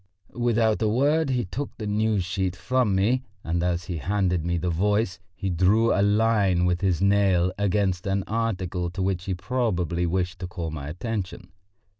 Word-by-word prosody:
Without 115 -2 +1
a 110 - +2
word 145 +6 +2
he 125 -4 0
took 130 +10 -5
the 110 - -5
News 105 -1 +1
sheet 95 0 -2
from 125 -1 +1
me, 115 +7 +2 0.2
and 85 +1 -1
as 90 0 0
he 90 -1 -4
handed 90 0 0
me 85 +1 0
the 90 +1 -1
Voice 105 +2 0 0.2
he 95 -1 -3
drew 100 +7 +3
a 100 - +2
line 105 -3 +3
with 90 0 0
his 95 -2 +1
nail 95 -3 +3
against 100 -2 0
an 95 0 0
article 95 -6 -2
to 95 +2 -5
which 95 -2 -1
he 95 - -2
probably 90 -5 -1
wished 90 +1 -1
to 90 - -4
call 85 -2 -5
my 70 -3 -6
attention. 90 +3 -5
95 Hz, 180 wpm, -25 LUFS, 90-110 Hz, 0.2 s, drew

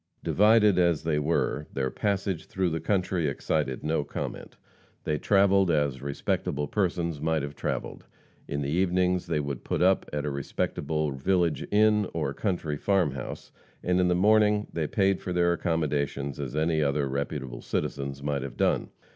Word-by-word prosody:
Divided 105 -2 +4
as 85 -3 +2
they 80 -2 +1
were, 75 -1 0
their 65 -1 -2
passage 100 -4 -2
through 95 -2 -1
the 80 - -1
country 90 -1 0
excited 70 -1 -1
no 75 -1 0
comment. - - -6 0.5
They 75 -1 -1
travelled 100 -2 +4
as 75 -5 +1
respectable 70 +1 -2
persons 85 -5 -1
might 80 -2 0
have 70 0 -5
travelled. - - -4 0.4
In 70 0 -2
the 70 - -2
evenings 90 +1 +1
they - - 0
would 70 -3 -4
put - - 0
up 95 +1 +3
at 75 0 -2
a 75 - -1
respectable 75 +2 -2
village 85 +4 0
inn, 105 -1 +4
or 70 - -1
country 85 -5 -2
farm 95 -3 +2
house, 65 -1 -7 0.3
and 90 0 +2
in 90 - +3
the 90 - +2
mornings 105 +2 +3
they 80 -3 -1
paid 95 +1 +1
for 90 - -4
their 85 0 +3
accommodations 75 -5 -1
as 70 -1 -4
any 80 0 +1
other 70 -1 +1
reputable 65 -2 -4
citizens 70 0 -3
might 70 -1 -1
have 70 - -7
done. - - +1
80 Hz, 165 wpm, -27 LUFS, 70-95 Hz, 0.5 s, Divided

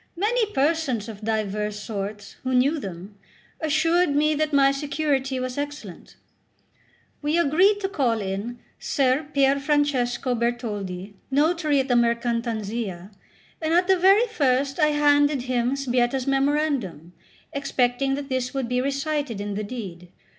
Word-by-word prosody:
Many 430 +3 +1
persons 275 - 0
of 215 -2 -9
divers 210 -1 -2
sorts, 205 -1 -6
who 260 0 0
knew 280 +5 +3
them, 195 -1 -8 0.4
assured 315 +1 +2
me 305 +1 +3
that 310 0 0
my 275 -1 +5
security 275 -2 -1
was 255 +1 -3
excellent. 285 - -7 1.1
We 300 +3 0
agreed 360 +6 +4
to 385 - 0
call 260 - 0
in 200 +5 -4 0.2
Ser 275 +1 +1
Pierfrancesco 275 -3 +1
Bertoldi, 210 -5 -3 0.2
notary 300 +1 +2
at 265 - 0
the 250 - +1
Mercantanzia; 230 -5 -1 0.5
and 320 +1 +1
at 360 +1 +3
the 380 - +5
very 390 +5 +5
first 275 - 0
I 305 - +5
handed 290 -2 +3
him 250 0 0
Sbietta's 250 -1 0
memorandum, 275 - 0 0.4
expecting 270 -1 0
that 280 0 -5
this 260 -1 -2
would 265 -3 -1
be 250 +1 0
recited 280 -3 -2
in 205 0 -4
the 210 +2 -3
deed. 195 -6 -7
265 Hz, 135 wpm, -24 LUFS, 230-295 Hz, 1.1 s, my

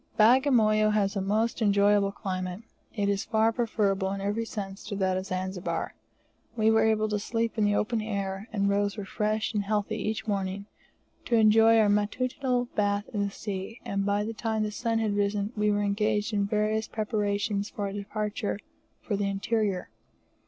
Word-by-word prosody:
Bagamoyo 220 -3 +5
has 205 -1 +1
a 195 - 0
most 220 +5 0
enjoyable 200 -1 +3
climate. 185 0 -4 0.3
It 205 -2 0
is 200 -1 0
far 220 0 +2
preferable 205 -5 0
in 200 - -4
every 205 +3 -1
sense 195 -3 -6
to 210 - -4
that 190 -1 +1
of 185 +1 -3
Zanzibar. 185 0 -3 0.6
We 220 0 +4
were 220 0 +4
able 215 -1 +2
to 210 -1 0
sleep 230 +2 -2
in 215 -2 +2
the 205 0 +2
open 220 +2 0
air, 200 -1 -3
and 200 -2 0
rose 200 +1 +1
refreshed 215 +2 -1
and 205 -1 0
healthy 210 +1 -1
each 215 +1 -3
morning, 200 -1 -2 0.6
to 235 - +1
enjoy 225 +1 +6
our 220 -2 +5
matutinal 245 +5 0
bath 205 0 +1
in 205 - 0
the 200 - 0
sea; 195 +2 -6
and 200 0 -1
by 205 +1 +1
the 225 +2 -4
time 220 -1 -1
the 210 - -2
sun 230 +1 -1
had 215 -2 0
risen 205 +1 0
we 210 0 +1
were 205 0 +1
engaged 210 +1 0
in 200 -1 +1
various 215 +1 0
preparations 205 -1 -1
for 205 - -5
our 195 - -4
departure 205 +1 -3 0.5
for 210 - -1
the 200 0 0
interior. 200 -1 -1
210 Hz, 180 wpm, -28 LUFS, 200-220 Hz, 0.6 s, enjoy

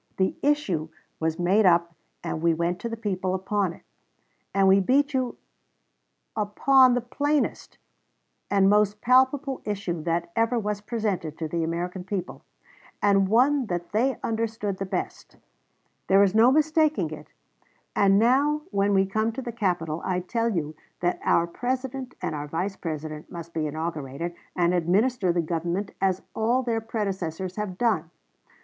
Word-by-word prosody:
The 190 0 +1
issue 205 - 0 0.3
was 160 0 -1
made 185 +5 +3
up 170 -2 +3 0.3
and 155 - -3
we 165 -1 +3
went 170 +2 -1
to 235 - -4
the 230 - -5
people 190 -4 -2
upon 190 0 0
it;... - - -14 0.7
and 195 0 +3
we 190 +1 +6
beat 280 +9 +2
you 255 -2 -1 1.0
upon 250 +5 +4
the 245 - 0
plainest 290 +5 -1 0.7
and 195 -1 +4
most 210 0 +3
palpable 265 +2 +3
issue 195 -5 -3
that 170 +1 -2
ever 230 +2 +2
was 210 -2 -2
presented 205 -8 -3
to 160 - -3
the 165 +1 -2
American 175 +3 -3
people, 190 -1 -5 0.6
and 200 -1 +3
one 255 +3 +3
that 175 -2 -4
they 245 +4 +1
understood 220 -3 -2
the 195 - -3
best. - - -5 0.7
There 195 +1 +6
is 195 -1 +2
no 230 +3 +6
mistaking 305 - +2
it; 150 -1 -9 0.7
and 195 -1 +4
now 280 +7 +3
when 200 0 +2
we 195 0 +4
come 215 +3 0
to 265 - -5
the 240 - -4
capitol, 175 -8 -1
I 180 -1 -1
tell 230 +5 -1
you 155 -7 -2 0.3
that 175 0 0
our 170 - +3
President 255 +6 -4
and 170 -3 -1
our 145 0 -4
Vice 180 +6 -2
President 155 -2 -6
must 170 -1 -8
be 155 -1 -1
inaugurated 155 0 -4 0.2
and 175 0 +2
administer 185 +4 +2
the 170 -1 0
government 170 +5 -2
as 190 -1 +1
all 240 +4 +1
their 230 -2 -1
predecessors 190 -5 -3
have 205 -4 -4
done. 195 -9 +1
195 Hz, 155 wpm, -26 LUFS, 170-230 Hz, 1.0 s, we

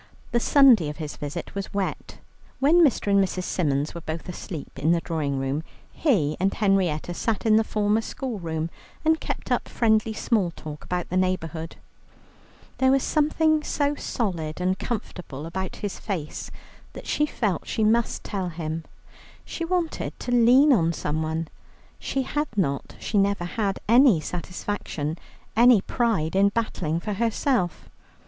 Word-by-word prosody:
The 235 - +3
Sunday 240 - +6
of 150 - -7
his 155 -3 -5
visit 150 +4 -6
was 200 0 -5
wet. 195 -2 -3 0.4
When 325 +6 +5
Mr. 240 -8 +2
and 200 0 +5
Mrs. 185 -1 -3
Symons 145 -5 0
were 170 - -7
both 160 +1 -5
asleep 170 -3 -7
in 155 +5 +3
the 170 - +1
drawing 150 -5 -2
room, 135 +3 -1 0.3
he 180 - +2
and 190 +2 +2
Henrietta 185 -6 +1
sat 220 +4 -2
in 215 -1 +5
the 220 - +5
former 210 0 +1
school 245 -1 -5
room, 160 -1 -3 0.3
and 320 0 +4
kept - - -4
up - - +1
friendly 220 -1 +2
small 215 -5 +1
talk 150 -1 -8
about 180 -1 -3
the 185 - 0
neighbourhood. 165 -3 -1 1.0
There 260 - +4
was 270 0 +3
something 310 0 +2
so 285 -1 0
solid 180 - -3
and 185 +1 0
comfortable 175 - -5
about 190 +3 -4
his 205 -2 -5
face 170 -8 -4 0.4
that - - -9
she 300 - +1
felt 205 - -2
she 220 - 0
must 230 +2 +2
tell 190 -4 -3
him. 160 -1 -4 0.6
She 335 - -5
wanted 340 -1 -2
to 245 - -3
lean 250 +5 +6
on 170 -7 +2
someone; 160 +1 -2 0.5
she 270 - -1
had 295 +3 -1
not, 140 -9 -1
she 210 - 0
never 195 -2 +1
had, 195 +1 -1
any 235 - +6
satisfaction, 170 -2 -4 0.4
any 235 0 +7
pride 195 -7 0
in 200 +1 +5
battling 180 -7 -1
for 210 +4 -3
herself. 230 - 0
195 Hz, 155 wpm, -25 LUFS, 165-235 Hz, 1.0 s, any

